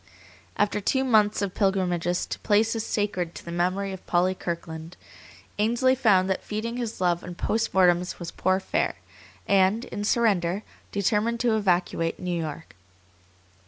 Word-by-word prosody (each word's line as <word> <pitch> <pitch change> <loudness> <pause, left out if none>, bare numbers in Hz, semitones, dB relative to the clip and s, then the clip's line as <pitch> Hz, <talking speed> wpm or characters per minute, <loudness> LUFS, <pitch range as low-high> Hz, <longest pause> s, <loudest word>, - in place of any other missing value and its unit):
After 210 0 +1
two 265 +6 +1
months 215 -5 +3
of 190 -2 -2
pilgrimages 180 -3 0
to - - -6
places 220 +1 +2
sacred 185 -6 -2
to - - -10
the 170 - -6
memory 185 +3 -1
of 190 - -9
Polly 180 +1 +2
Kirkland, 165 -1 -6 0.6
Ainsley 240 +4 +3
found 205 -8 +3
that 190 - -1
feeding 230 +3 -4
his 235 -3 -4
love 175 -2 +1
on 180 -1 -7
post 225 +5 -1
mortems 180 -1 +3
was 170 -2 -6
poor 185 +1 +1
fare, - - -1 0.5
and, 200 +4 +3
in 205 - -5
surrender, 205 -4 +1 0.3
determined 210 +4 0
to 235 -3 +2
evacuate 175 -4 0
New 180 -1 -2
York. 160 -1 -5
190 Hz, 150 wpm, -26 LUFS, 175-215 Hz, 0.6 s, months